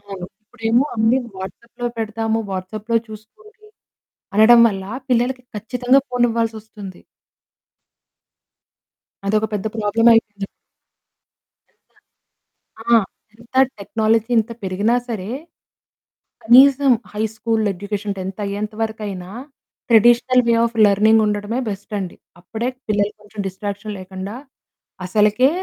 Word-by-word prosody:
అవును. 195 -3 -8 0.2
ఇప్పుడేమో 225 +3 0
అన్ని 225 +3 +3 0.2
వాట్సాప్‌లో 235 +6 -7
పెడతాము, 225 0 -1
వాట్సాప్‌లో 210 +5 -3
చూసుకోండి, 425 - -15 0.7
అనడం 235 +3 +7
వల్ల 195 -3 -4 0.3
పిల్లలకి 250 +1 +1
ఖచ్చితంగా 250 +5 +2
ఫోనివ్వాల్సోస్తుంది. 225 -5 -2 2.3
అదొక 215 +2 +1
పెద్ద 205 0 -3
ప్రాబ్లమైపోయింది. 215 -1 +2 1.2
పెద్ద - - -45 0.9
ఆ! - - -23 0.5
ఎంత 235 +2 -20 0.2
టెక్నాలజీ 220 +3 0
ఇంత 225 +1 0
పెరిగినా 200 +5 +1
సరే, 210 -4 -4 1.2
కనీసం 270 +3 +6 0.2
హై 210 - -3
స్కూల్ 225 0 -1
ఎడ్యుకేషన్ 200 +2 -4
10థ్ 190 +2 -5
అయ్యేంత 205 +2 -4
వరకైనా 210 -5 -4 0.6
ట్రెడిషనల్ 240 +2 +5
వే 235 - +4
ఆఫ్ 235 0 -4
లెర్నింగ్ 215 +2 +4
ఉండడమే 210 +3 -2
బెస్ట్ 200 +1 -7
అండి. 185 -3 -6 0.2
అప్పుడే 225 +6 -4 0.2
పిల్లలకి 210 0 0
కొంచెం 210 0 -7
డిస్ట్రాక్షన్ 205 +2 -5
లేకుండా 190 +3 -7 0.7
అసలకే 210 +6 +3
220 Hz, 100 wpm, -20 LUFS, 205-235 Hz, 2.3 s, అనడం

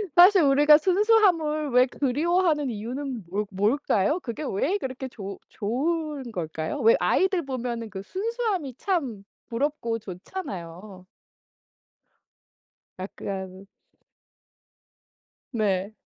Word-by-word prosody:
사실 370 +2 +8
우리가 295 +2 +6
순수함을 360 -5 +3
왜 250 +1 +6
그리워하는 295 +3 +1
이유는 240 +2 -5
뭐 205 +3 -1
뭘까요? 210 - +1
그게 235 +4 -5
왜 300 - 0
그렇게 265 -5 -5
좋 200 -6 -8
좋은 280 +4 -2
걸까요? 160 - -4
왜 225 +1 +6
아이들 375 -2 +2
보면은 240 -3 -4
그 190 -2 -6
순수함이 400 - -2
참 275 - -2 0.2
부럽고 235 -2 -2
좋잖아요. 185 - -8 1.9
약간 190 0 -6 1.9
네. 205 -2 0
255 Hz, 215 characters per minute, -26 LUFS, 205-320 Hz, 1.9 s, 사실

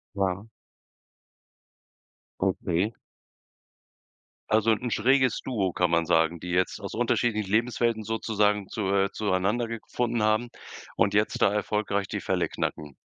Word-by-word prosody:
Ja. 95 +1 -1 1.9
Okay. 95 +7 0 1.6
Also 110 +1 +3
'n 120 +2 -3
schräges 130 +3 +2
Duo, 100 -8 -1
kann 90 -1 +1
man 85 0 +2
sagen, 80 0 +2
die 90 - -6
jetzt 90 +1 0
aus 100 - -7
unterschiedlichen 110 -3 0
Lebenswelten 115 0 +1
sozusagen 105 -2 0
zu 100 -3 -2
äh, 100 0 +2
zueinandergefunden 115 +4 -1
haben 110 +3 +2 0.5
und 100 - +2
jetzt 110 +3 +1
da 100 - +5
erfolgreich 105 -1 -1
die - - -4
Fälle - - 0
knacken. 75 -3 -4
105 Hz, 120 wpm, -27 LUFS, 95-115 Hz, 1.9 s, da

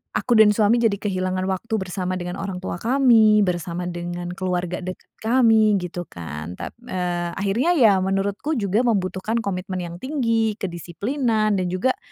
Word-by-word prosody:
aku 240 -3 +2
dan 210 -1 +7
suami 215 +2 +3
jadi 225 -3 +2
kehilangan 185 -2 -1
waktu 205 +4 -3
bersama 185 0 -3
dengan 180 +1 -5
orang 190 -2 -5
tua 180 - -4
kami, 225 -3 +4
bersama 175 -1 -1
dengan 175 0 -5
keluarga 180 -1 -2
dekat 185 - -8 0.2
kami, 225 -3 +4
gitu, 175 0 -5
kan. 80 0 -7
Tap - - -8
eee, 175 -4 -2
akhirnya, 220 - +1
ya, 225 - +5
menurutku 195 +9 -1
juga 215 0 +1
membutuhkan 210 +1 0
komitmen 185 -2 -3
yang 170 -1 -6
tinggi, 230 -3 0
kedisiplinan, 210 - -1
dan 185 - 0
juga, 185 - 0
195 Hz, 155 wpm, -22 LUFS, 180-225 Hz, 0.2 s, dan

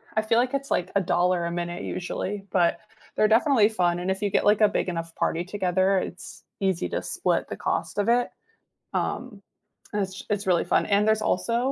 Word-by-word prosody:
I 215 - +3
feel 225 +1 +1
like 250 +2 0
it's 275 0 -2
like 175 - 0
$1 180 -2 +2
a 170 - -2
minute 175 0 -4
usually, 195 +2 -4
but 175 -2 +2 0.4
they're 215 - +4
definitely 225 -2 +4
fun, 175 -4 +1
and 180 +2 -1
if 190 - -3
you 205 - +1
get, - - +1
like, 210 +1 +4
a 210 - +7
big 190 - -1
enough 165 -1 -4
party 170 +1 0
together, 190 0 +1
it's 180 - -8 0.2
easy 190 -3 0
to - - -2
split - - -1
the - - -5
cost - - -2
of 205 +1 +1
it. 245 - -2 0.7
Um, 235 -6 -3 0.6
it's 190 0 -4 0.2
it’s 205 -1 -3
really 175 -2 +3
fun, - - +4
and 200 - +5
there's 220 0 +3
also 230 +6 0
195 Hz, 200 wpm, -25 LUFS, 175-215 Hz, 0.7 s, a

